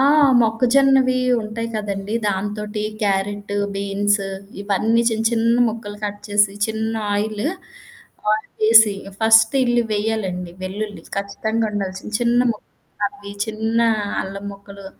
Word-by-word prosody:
ఆ! - - +4 0.4
మొక్కజొన్నవి 255 +3 +3 0.2
ఉంటాయి 225 +2 -4
కదండీ! 205 0 -3
దాంతోటి 210 +2 -2 0.2
క్యారెట్టు, 205 0 -1 0.2
బీన్స్ 200 +1 0 0.4
ఇవన్నీ 215 +3 +1
చిన్న 225 0 -1
చిన్న 230 0 +2
ముక్కలు 210 -2 -6
కట్ 205 0 -4
చేసి 205 -1 +3
చిన్న 220 0 -2 0.2
ఆయిలు, 210 +4 -1 0.8
ఆయిలేసి 215 +1 -2
చేేసి 220 -1 +7 0.3
ఫస్ట్ 225 +2 +5
ఇల్లి 240 -1 +2
వెయ్యాలండి. 205 -4 -2
వెల్లుల్లి. 205 +2 -5
ఖచ్చితంగా 220 +3 -1
ఉండాల్సిన 195 -1 -4
చిన్న 240 0 +3
ముక్కలవి, 205 -1 -7
చిన్న 220 +1 -1 0.4
అల్లం 195 +1 -7
మొక్కలు 200 0 -12
210 Hz, 110 wpm, -21 LUFS, 200-225 Hz, 0.8 s, చేేసి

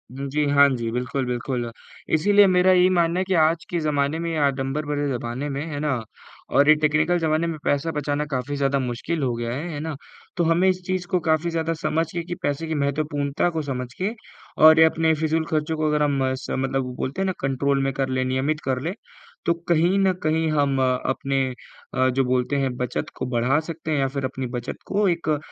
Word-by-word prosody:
हुँ 140 0 -4
जी, 150 +1 0
हाँ 140 0 +6
जी, 120 -3 -2
बिल्कुल, 125 +2 -2
बिल्कुल। 120 -1 -3 0.4
इसीलिए 205 +5 +5
मेरा 185 0 +4
यही 180 0 +5
मानना 170 0 +2
है - - +1
कि 190 - -1
आज 165 +1 0
के 175 - -1
ज़माने 150 0 0
में 170 0 -2
या 150 -2 +2
आडंबर 135 +2 -2
भरे 145 0 -1
ज़माने 125 +3 -3
में, 140 +3 -3
है 145 - -4
ना, 150 -3 0 0.5
और 140 +3 +4
ये 155 - +8
टेक्निकल 155 +3 +2
ज़माने 160 +1 +1
में 160 -2 -3
पैसा 145 +3 0
बचाना 150 0 -2
काफ़ी 130 +2 -2
ज़्यादा 140 0 +1
मुश्किल 130 +5 -3
हो 125 -2 0
गया 120 0 -3
है। 150 +7 -4
है 145 - -4
ना? 155 -1 -4 0.4
तो 170 - +2
हमें 165 +3 +3
इस 185 0 -1
चीज़ 185 -1 -2
को 180 - +1
काफ़ी 160 +1 +1
ज़्यादा 165 0 -1
समझ 160 +1 0
के 170 -1 -3
कि 175 +1 -5
पैसे 145 +3 -1
की 160 - -2
महत्वपूर्णता 145 +2 0
को 160 -2 -2
समझ 125 -3 -5
के, 195 +4 -2 0.5
और 160 +1 +8
ये 160 - +9
अपने 160 0 +2
फ़िज़ूल 160 +1 0
खर्चों 155 0 -1
को 155 0 0
अगर 150 0 +2
हम 145 -1 +1
मस 130 0 -2
मतलब 130 -1 -2
बोलते 140 +9 -3
हैं - - +1
ना, 190 - 0
कन्ट्रोल 135 +1 +1
में 135 - 0
कर 135 -1 -1
लें, 130 0 0
नियमित 135 +4 0
कर 130 -1 0
लें, 170 +5 -2 0.5
तो 170 - +3 0.2
कहीं 170 +4 +3
न 190 -1 +3
कहीं 160 +1 +1
हम 140 -3 +1
अपने 130 +1 0 0.5
अ, 130 0 +2
जो 135 +1 +1
बोलते 125 +2 0
हैं, 135 -2 -1
बचत 125 -1 -3
को - - -4
बढ़ा 130 +6 +2
सकते 160 -1 -5
हैं 145 - +1
या 135 - +2
फिर 135 - -1
अपनी 130 0 -4
बचत 120 - -5
को 205 0 +1
एक 165 -3 0
150 Hz, 225 wpm, -23 LUFS, 135-165 Hz, 0.5 s, ये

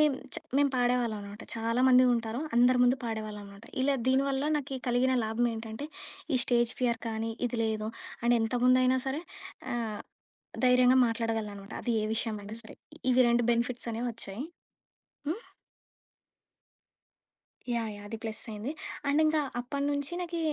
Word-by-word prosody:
మేము 300 -3 +4 0.2
చ్ - - -4 0.2
మేము 285 -1 +4
పాడేవాళ్ళం 245 -2 +2
అనమాట. 205 +2 -9
చాలామంది 250 +3 +4
ఉంటారు 230 +1 -2 0.2
అందరి 250 +1 +5
ముందు 250 +2 +5
పాడేవాళ్ళం 215 -2 -4
అనమాట. 200 +2 -13 0.2
ఇలా 280 +1 +3
దీనివల్ల 270 +2 +2
నాకి 275 -2 -3
కలిగిన 255 +1 +3
లాభం 225 +2 +1
ఏంటంటే, 225 +4 -6 0.5
ఈ 255 - +4
స్టేజ్ 240 -1 +2
ఫియర్ 235 -2 +1
కానీ, 225 0 -2 0.2
ఇది 240 0 -3
లేదు 220 -1 -1 0.4
అండ్ 240 0 +5
ఎంత 225 +2 0
ముందైనా 255 +1 +5
సరే 275 +4 -1 0.5
ఆహ్, 225 -3 -3 0.6
ధైర్యంగా 250 0 +6
మాట్లాడగలననమాట. 220 -3 -3
అది 240 - 0
ఏ - - 0
విషయమైనా 215 -1 -3
సరే, 220 - -12 0.3
ఇవి 255 +1 +5
2 235 0 +3
బెనిఫిట్స్ 235 +1 -1
అనేవి 235 +2 -2
వచ్చాయి. 220 +2 -6 0.9
హ్మ్. 395 +8 -2 2.3
యాహ్! 230 -2 -1
యాహ్! 205 0 -10
అది 225 - -4
ప్లస్సయింది 220 +2 -4 0.4
అండ్ 290 +2 +3
ఇంకా 310 0 +3 0.2
అప్పటినుంచి 285 +3 -2
నాకి 345 -1 -3
240 Hz, 140 wpm, -30 LUFS, 220-260 Hz, 2.3 s, ధైర్యంగా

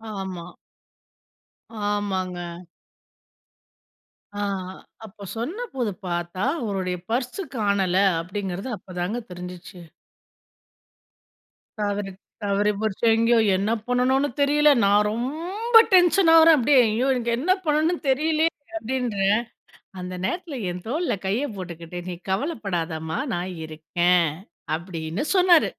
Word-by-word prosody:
ஆமா. 185 -3 -6 1.4
ஆமாங்க. 190 -3 -1 2.0
ஆ, - - -4 0.7
அப்ப 200 -1 -11
சொன்னபோது 265 - -3 0.2
பாத்தா 175 +2 -3 0.2
அவருடைய 190 -5 -2
பர்ஸ் 250 - -2 0.2
காணல, 200 -3 +1 0.2
அப்டிங்கறது 190 +4 -5
அப்பதாங்க 185 +5 -4
தெரிஞ்சுச்சு. 180 0 -9 2.0
தவறி, 205 -1 -2 0.3
தவறி 205 +1 +2
போச்சு. 215 0 -3
எங்கயோ 230 +1 +4 0.2
என்ன 205 +3 0 0.2
பண்ணனுன்னு 260 +3 +2
தெரில. 295 +1 +4 0.2
நான் 205 +1 +4
ரொம்ப 345 - -3 0.2
டென்ஷன் 355 -1 +6
ஆகறேன். 325 0 +8
அப்பிடியே 265 +2 +4
"ஐயோ! 230 +5 0
எனக்கு 235 -2 -1
என்ன 345 +8 +1
பண்ணனுன்னு 310 +3 +2
தெரியலயே! 315 +4 +2 0.3
அப்பிடின்றேன்." 220 -7 0 0.6
அந்த 180 0 -6
நேரத்துல 330 - -3
என் 180 0 -6
தோள்ல 320 +3 0
கைய 225 +9 0
போட்டுக்கிட்டு 175 -1 -7
நீ 180 - -3 0.2
கவலப்படாதம்மா! 185 - -2 0.2
நான் 180 +1 -3
இருக்கேன் 170 +2 +1 0.5
அப்பிடின்னு 170 - -4
சொன்னாரு. 360 -3 +5
205 Hz, 100 wpm, -24 LUFS, 180-275 Hz, 2.0 s, ஆகறேன்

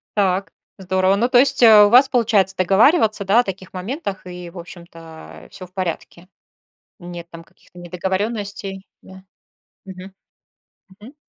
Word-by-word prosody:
Так. 195 -1 -1 0.3
Здорово. 190 +1 0
Ну, 240 +4 0
то 245 - +3
есть 260 -2 +2
у 210 -2 +7
вас 260 +3 +5
получается 210 -6 +1
договариваться, 215 - +2
да, 205 +5 +3
о - - -7
таких 190 -2 -9
моментах 200 - -6
и, 180 -1 -9
в 180 - -15
общем-то, 165 -2 -13
э, - - -18
всё 185 -2 -12
в 180 - -35
порядке? 180 -1 -6 0.7
Нет 175 -1 -10
там 165 0 -12
каких-то 175 - -25
недоговорённостей, 195 +2 -5 0.2
да? 190 0 -15 0.6
Мгм, 190 0 -11 0.9
мгм. 245 +8 -14
190 Hz, 145 wpm, -19 LUFS, 180-210 Hz, 0.9 s, у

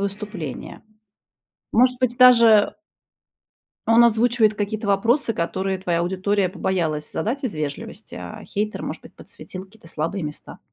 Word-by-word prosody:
выступления? 200 - -6 0.9
Может 250 +2 +3
быть, 250 -1 0
даже 230 -5 +6 1.1
он 230 +1 +6
озвучивает 225 -1 +3
какие-то 210 +1 -3
вопросы, 230 +6 +2
которые 190 +1 -2
твоя 175 -2 -1
аудитория 190 +2 0
побоялась 170 -5 -2
задать 260 +6 -2
из 225 -9 -3
вежливости, 155 +10 -6
а 215 -1 -8
хейтер, 210 +1 -3
может - - -6
быть, - - -15
подсветил 185 0 -10
какие-то 195 -3 -17
слабые 165 +5 -3
места. 150 0 -8
205 Hz, 130 wpm, -22 LUFS, 185-230 Hz, 1.1 s, даже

